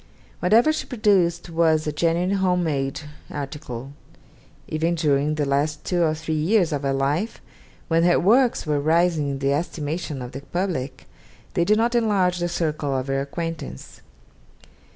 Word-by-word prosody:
Whatever 225 - +4
she - - -4
produced 190 -8 +2
was 160 -1 +2
a 150 - -1
genuine 170 +5 +1
home 180 -2 +1
made 135 -3 -2 0.3
article. 135 -2 -6 0.7
Even 165 +2 0
during 150 -2 +1
the 150 -1 0
last 145 +2 0
two 180 -1 0
or 155 -2 +2
three 160 0 -4
years 170 +3 +2
of 145 - -1
her 140 -1 0
life, 145 +10 -1 0.5
when 165 0 +2
her 175 0 +4
works 240 +5 +3
were 150 -2 +1
rising 160 0 +2
in 140 - -2
the 135 +1 +1
estimation 150 -2 -3
of 125 - -7
the 135 - -7
public, 140 -6 -3 0.5
they 170 - +2
did 210 +4 +3
not 235 +2 +1
enlarge 200 -6 +2
the 175 0 -1
circle 155 -5 -1
of 130 - -2
her 135 0 0
acquaintance. 150 - -6
160 Hz, 160 wpm, -23 LUFS, 140-180 Hz, 0.7 s, Whatever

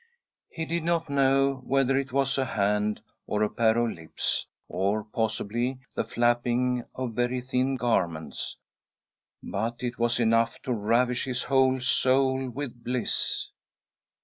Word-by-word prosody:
He 160 - -4
did 170 +2 -1
not 165 -2 0
know 135 -1 +3
whether 135 0 +2
it 135 0 -1
was 135 0 +1
a 135 - +1
hand, 105 -1 0 0.3
or 105 0 0
a 105 - +1
pair 115 0 +2
of 120 -1 +1
lips 80 -1 -2
— - - -67
or, 100 +3 0
possibly, 115 +3 -1 0.2
the - - -1
flapping 120 +2 +1
of 130 -3 -3
very 125 +2 0
thin 130 +1 0
garments 85 - -1 0.9
—but 115 +5 -3
it 120 -1 -3
was 120 +1 +2
enough 115 0 +2
to 125 - -1
ravish 120 +3 +1
his 125 -2 -2
whole 130 0 +3
soul 130 +1 +3
with 125 -2 -6
bliss. 125 0 0
125 Hz, 145 wpm, -27 LUFS, 115-130 Hz, 0.9 s, know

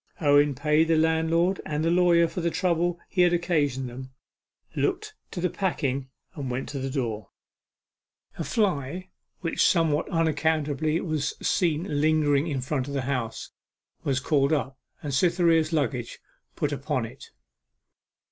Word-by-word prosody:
Owen 145 -2 +4
paid 150 +4 +2
the 165 - +3
landlord 160 +3 +2
and 150 +1 -2
the 165 - +2
lawyer 175 -1 +4
for 175 - -5
the 170 - +1
trouble 175 0 0
he 180 - 0
had 175 0 +4
occasioned 150 -7 0
them, 130 +2 -8 0.7
looked 430 0 -1 0.2
to - - -6
the 180 - +1
packing, 140 -8 -2 0.2
and 140 -7 -5
went 125 +2 -3
to 140 - -4
the 135 0 -3
door. 115 -7 -3 1.1
A - - -1
fly, 185 - -1 0.3
which 165 - 0
somewhat 165 -3 +2
unaccountably 155 -2 +1
was 155 -5 -2
seen 155 -3 0
lingering 155 -1 +2
in 140 -5 -2
front 130 0 -2
of 140 - -5
the 135 - 0
house, 125 -4 -3 0.5
was 135 -2 0
called 140 +1 +1
up, 135 -3 0 0.3
and 145 -2 -3
Cytherea's 165 +1 +3
luggage 125 -6 -1 0.4
put - - -1
upon - - -2
it. - - -12
155 Hz, 145 wpm, -26 LUFS, 140-170 Hz, 1.1 s, Owen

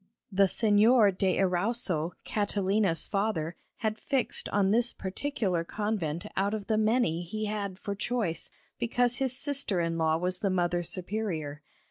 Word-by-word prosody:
The 195 +1 +4
Señor 210 0 +4
de 190 -1 +1
Erauso, 180 -3 0
Catalina's 200 -3 0
father, 195 -5 -1 0.2
had 220 -1 -2
fixed 270 -3 0
on 200 -1 +2
this 235 +2 +2
particular 190 -3 -2
convent 175 -5 -2
out 200 +3 +1
of 210 -2 -5
the 220 - +1
many 215 -6 +2
he 215 +5 -4
had 205 -3 -3
for 200 0 -4
choice, 205 -4 -2 0.3
because 245 +1 +1
his 260 -2 0
sister 280 - 0
in 165 -1 -1
law 160 0 +2
was 180 +2 -1
the 200 - 0
Mother 175 -1 +1
Superior. 175 -5 -3
200 Hz, 145 wpm, -29 LUFS, 175-220 Hz, 0.3 s, The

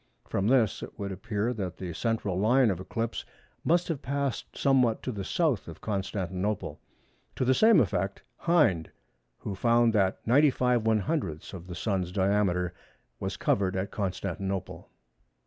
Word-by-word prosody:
From 100 - 0
this 120 -5 +3
it - - -9
would 100 -2 -4
appear 105 +4 -2
that 95 -6 -4
the 90 -2 -5
central 105 -2 -1
line 120 +2 +4
of 90 - -3
eclipse 115 +4 -3 0.4
must 175 +2 +2
have 160 -5 -3
passed 140 -1 -3
somewhat 125 -5 +3
to 130 - -2
the 100 -4 -5
south 145 - 0
of 85 -1 -9
Constantinople. 95 -1 -3 0.6
To 130 - 0
the 130 - +4
same 220 - +6
effect 100 - -1
Hind, 145 - +2 0.5
who 100 - -5
found 115 +3 +3
that 95 -3 +1
95/100ths 120 - +2
of 90 -2 -8
the 90 - -6
Sun's 95 -2 -1
diameter 95 -2 +1 0.5
was - - -3
covered 95 -2 +1
at 95 +1 -2
Constantinople. 95 -1 -3
105 Hz, 145 wpm, -28 LUFS, 95-125 Hz, 0.6 s, same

